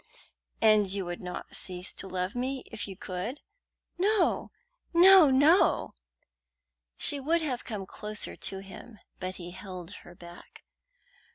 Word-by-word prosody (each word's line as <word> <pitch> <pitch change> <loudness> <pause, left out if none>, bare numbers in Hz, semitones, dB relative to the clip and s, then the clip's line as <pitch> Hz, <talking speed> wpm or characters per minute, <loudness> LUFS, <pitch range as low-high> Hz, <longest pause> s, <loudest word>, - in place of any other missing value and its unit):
"And 215 -2 +5
you 195 0 -3
would 175 0 -6
not 180 -1 -7
cease 180 0 -2
to 195 - -5
love 185 0 -3
me 260 +2 -2
if 220 -2 -5
you 190 -2 -9
could?" 195 +9 -5 0.6
"No, 400 0 +2 0.5
no, 365 -2 +9
no!" 290 +8 +4 1.0
She 285 - +3
would 325 +4 +1
have 255 -5 -3
come 210 -5 -5
closer 210 +2 -6
to 195 0 -5
him, 205 +4 -12 0.2
but 185 +1 -4
he 175 -1 -8
held 185 -1 -8
her 175 - -14
back. 175 0 -14
205 Hz, 135 wpm, -29 LUFS, 185-270 Hz, 1.0 s, no